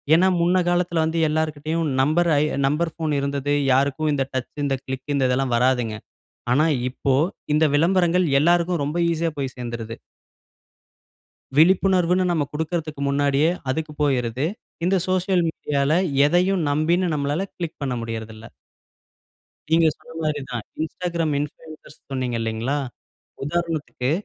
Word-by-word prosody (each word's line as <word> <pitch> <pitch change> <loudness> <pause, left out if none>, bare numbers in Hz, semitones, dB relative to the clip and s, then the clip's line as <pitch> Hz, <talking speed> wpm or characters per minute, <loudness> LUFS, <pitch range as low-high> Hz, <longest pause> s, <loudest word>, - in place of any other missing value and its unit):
ஏன்னா 180 +3 +4
முன்ன 175 +2 +3
காலத்தில 175 -1 +1
வந்து, 160 +1 -1
எல்லார்கிட்டயும் 155 +1 -1
நம்பர 165 +5 +2
அ - - +2 0.3
நம்பர் 155 +3 0
ஃபோன் 160 -2 -2
இருந்தது. 140 0 -1 0.2
யாருக்கும் 140 +3 +1
இந்த 135 -2 0
டச், 130 -1 -3
இந்த 135 -1 0
கிளிக், 130 0 -6
இந்ததெல்லாம் 130 -1 +1
வராதுங்க. 120 -3 +1 0.6
ஆனா 150 +5 +4 0.3
இப்போ, 135 +1 0 0.4
இந்த 155 +1 +4
விளம்பரங்கள் 180 +2 +3 0.2
எல்லாருக்கும், 175 0 +2
ரொம்ப 150 +4 -3
ஈஸியா 165 0 -1
போய் 135 -2 -3
சேர்ந்துருது. 115 -2 -5 1.6
விழிப்புணர்வுன்னு, 185 +1 +4
நம்ம 160 -4 +1
குடுக்கிறதுக்கு 155 -1 -3
முன்னாடியே 140 +2 +2 0.2
அதுக்கு 155 +3 -3
போயிருது. 130 -1 0 0.4
இந்த 195 +2 +3
சோசியல் 185 -1 +1
மீடியால, 140 -2 -1 0.3
எதையும் 180 +3 +2
நம்பி 165 +4 +1
நம்மளால 145 +6 -1
கிளிக் 170 -3 -5
பண்ண 130 -2 -1
முடியிறதில்ல. 110 -1 -6 1.3
நீங்க 165 0 +5
சொன்னமாரி 155 -2 -4
தான். 120 -3 -4 0.2
Instagram 170 0 -2
இன்ஃப்ளூயன்சர் 155 +2 -8 0.2
சொன்னீங்க, 130 -3 -2
இல்லிங்களா! 115 +5 -1 0.7
உதாரணத்துக்கு, 155 -5 -2
150 Hz, 120 wpm, -23 LUFS, 135-170 Hz, 1.6 s, நீங்க